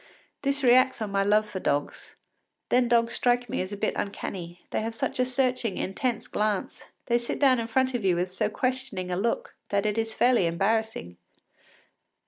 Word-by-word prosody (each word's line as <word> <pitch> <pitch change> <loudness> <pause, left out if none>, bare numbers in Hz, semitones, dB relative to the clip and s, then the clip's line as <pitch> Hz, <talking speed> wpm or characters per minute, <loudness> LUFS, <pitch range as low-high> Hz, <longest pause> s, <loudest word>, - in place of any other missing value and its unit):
This 280 0 -1
reacts 255 +1 +5
on 215 -2 -3
my 195 0 +2
love 210 +2 +3
for 190 - -5
dogs. 145 -4 -2 0.5
Then 250 0 +3
dogs 235 0 +2
strike 245 0 +1
me - - -1
as 185 +2 -5
a 205 - -5
bit 215 - 0
uncanny; 175 -3 -5
they - - 0
have 225 +1 -4
such 225 - -3
a 255 - +4
searching, 250 -5 0
intense 230 +4 -2
glance; 210 -2 -2 0.2
they 240 -1 +2
sit 235 - -3
down 265 -3 +4
in 230 - -3
front 260 +3 +1
of 240 -4 -2
you 185 -2 +3
with 180 +1 -2
so 215 +2 0
questioning 255 -6 -2
a - - 0
look 230 +5 -1 0.2
that 200 +1 0
it 210 +1 0
is 225 0 -2
fairly 240 -8 +4
embarrassing. 195 - -1
225 Hz, 190 wpm, -27 LUFS, 195-250 Hz, 0.5 s, reacts